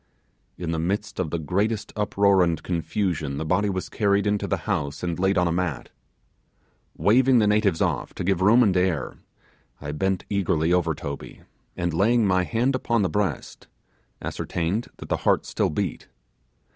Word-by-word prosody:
In 85 -2 -3
the 80 - -1
midst 100 +5 -2
of 90 -4 -1
the 85 - -2
greatest 100 +7 -1
uproar 100 -2 +3
and 85 -3 +1
confusion 85 -4 -2
the 80 - -3
body 100 +5 +1
was 95 -1 -3
carried 100 -1 +1
into 105 0 0
the - - 0
house 70 +2 -2
and 85 -1 -2
laid 95 +1 +2
on 90 -1 +3
a - - 0
mat. 85 -5 -2 1.1
Waving 125 +4 +4
the 110 - +4
natives 105 -4 +2
off - - -1
to - - -4
give 95 0 +1
room 115 +6 +6
and 100 -5 +2
air, 90 -6 0 0.6
I 75 0 -5
bent 95 +5 -1
eagerly 85 -4 +1
over 85 -3 +1
Toby, 70 -1 -7 0.4
and, 85 -1 -1
laying 110 +6 +3
my 95 -2 +2
hand 120 +6 +1
upon 120 -4 0
the 95 - +1
breast, 100 -9 -3 0.6
ascertained 90 +9 -2
that - - -10
the - - +1
heart - - +1
still - - 0
beat. 90 +1 -3
95 Hz, 170 wpm, -24 LUFS, 85-105 Hz, 1.1 s, room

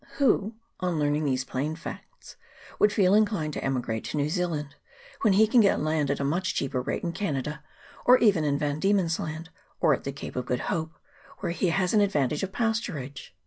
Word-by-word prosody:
Who, 230 -6 +2 0.2
on 180 -3 -1
learning 150 0 +1
these 130 -2 0
plain 145 +5 -2
facts, 165 - -10 0.4
would 210 - +5
feel 195 -2 +3
inclined 205 -8 +2
to - - -4
emigrate 120 -4 -2
to - - -4
New 145 +1 +1
Zealand 160 -5 -2 0.5
when 215 -3 +4
he 215 +3 +6
can 230 +2 +5
get 200 - +3
land 155 -2 0
at 140 - 0
a - - -1
much 175 +7 -1
cheaper 130 -2 -1
rate - - -3
in 170 - -1
Canada, 150 -5 -3 0.4
or 250 +1 +7
even 200 -10 +3
in 145 -1 +1
Van 145 0 -1
Diemen's 190 -3 +2
Land, 160 +1 -5 0.3
or 155 - +4
at - - -3
the 140 - -3
Cape 135 - -8
of 125 -1 -3
Good 125 - -1
Hope, 160 0 -3 0.5
where - - -1
he 175 +2 0
has 180 +1 +1
the 210 - +4
advantage 150 -7 0
of 195 - -3
pasturage 195 - -3
160 Hz, 205 wpm, -27 LUFS, 145-195 Hz, 0.5 s, or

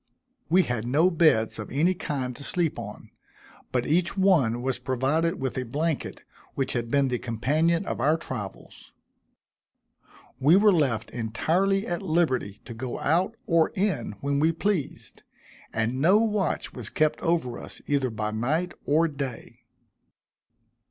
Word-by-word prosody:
We 180 +3 +5
had 120 -5 -3
no 155 +8 +3
beds 155 -11 +3
of 105 - -6
any 160 +7 +2
kind 135 -8 -4
to 140 - -9
sleep 170 +1 -1
on, - - -9 0.6
but 125 -1 0
each 175 +5 +1
one 140 -12 +3
was 130 -1 -1
provided 135 +6 0
with 130 -1 -2
a - - -2
blanket, 150 +5 -3 0.3
which 135 -2 -1
had 120 -1 -2
been 140 +1 +2
the 125 -1 -1
companion 155 - 0
of - - -3
our 150 +5 +3
travels. 105 -11 -8 1.5
We 145 +6 +5
were 205 +1 +6
left 130 -10 0
entirely 175 - 0
at 175 -2 -3
liberty 155 - 0
to 120 - -7
go 120 +2 -5
out 180 +9 +1
or 165 -2 +3
in 185 - -1
when 140 0 0
we 160 +2 +3
pleased, 170 -2 -3 0.5
and 115 +4 -1
no 185 +7 +6
watch 210 -5 0
was - - -6
kept 155 -1 +1
over 165 -8 0
us - - -11
either 140 -3 +1
by 110 -1 -3
night 155 +11 -1
or 160 +3 +4
day. 135 -6 -7
145 Hz, 150 wpm, -26 LUFS, 125-170 Hz, 1.5 s, were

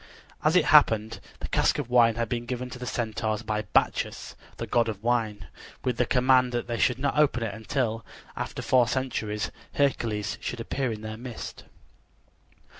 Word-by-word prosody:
As - - +3
it - - +5
happened, 110 0 +4 0.2
the - - -4
cask - - +2
of 135 -5 -4
wine 115 -2 +5
had 115 0 -1
been 120 +1 -3
given 125 0 -4
to 125 - -8
the 125 - -6
Centaurs 110 -2 -2
by 105 0 -1
Bacchus, - - 0 0.2
the - - -4
god 115 -1 +2
of 105 -1 -6
wine, 110 -4 0 0.4
with 125 -2 -1
the 125 - +2
command 125 -1 +4
that 120 - -1
they 120 -1 -3
should 125 -2 +3
not 140 +2 0
open 140 -5 +3
it 110 - -3
until, 115 0 -2 0.3
after - - -4
four 125 -2 +4
centuries, 110 -4 -2 0.2
Hercules 105 -7 0
should 120 - -4
appear 130 +2 -2
in 105 -1 -6
their 110 0 -6
midst. 120 -1 -8
120 Hz, 180 wpm, -27 LUFS, 110-125 Hz, 0.4 s, it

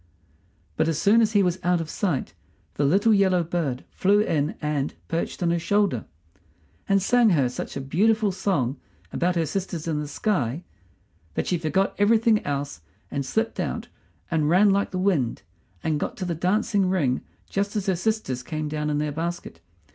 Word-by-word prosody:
But - - +2
as 165 -3 0
soon 215 +6 +4
as 220 -1 +2
he 205 -2 +5
was 180 0 0
out 175 0 +2
of 165 - -4
sight 170 - -2 0.4
the 145 - 0
little 200 +9 +4
yellow 190 -3 +3
bird 160 -7 -2
flew 200 +2 +3
in 155 -7 0
and 150 -2 -2
perched 165 +2 -2
on 170 - +2
her 170 - +1
shoulder, 200 - +1 0.8
and 195 0 +4
sang 235 +4 +4
her 145 -9 +3
such 125 - -5
a - - -3
beautiful 210 +9 +2
song 150 -9 -1 0.4
about 180 +1 +1
her 165 -1 +1
sisters 170 -1 -4
in 155 -2 0
the 150 - -4
sky 150 - -1 0.7
that - - -1
she 180 - 0
forgot 170 +5 +1
everything 220 +1 +4
else 140 - -3 0.3
and 140 -1 -2
slipped 220 - -1
out - - -3 0.4
and 155 -2 +2
ran 195 +4 +5
like 200 +1 +1
the 185 - -4
wind, 170 - 0 0.4
and 155 -2 0
got - - -3
to 185 - -3
the 175 - -1
dancing 190 +3 +1
ring 145 -9 +1 0.3
just 200 +1 -2
as 205 -3 -1
her 190 - +1
sisters 180 - -1
came 155 +4 -4
down 150 0 -2
in 150 - 0
their 150 0 -1
basket. 165 - -5
175 Hz, 185 wpm, -25 LUFS, 150-200 Hz, 0.8 s, he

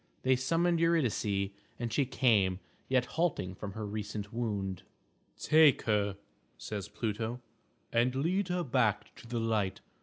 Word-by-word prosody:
They 130 0 +4
summoned 165 +6 +1
Eurydice, 110 -12 +1 0.3
and 115 -2 -3
she 135 +2 +2
came, 105 -8 +3 0.3
yet 130 -1 +3
halting 145 - -1
from 100 +1 -7
her 110 0 -4
recent 105 0 -5
wound. 100 -6 -2 0.6
"Take 155 -3 +5
her," 105 -2 +1 0.4
says 105 -3 -5
Pluto, 110 +2 -3 0.5
"and 120 +2 +2
lead 175 +8 +1
her 180 -1 -1
back 120 -7 +1
to - - -12
the 120 0 -2
light. 110 -4 0
115 Hz, 140 wpm, -31 LUFS, 105-135 Hz, 0.6 s, Take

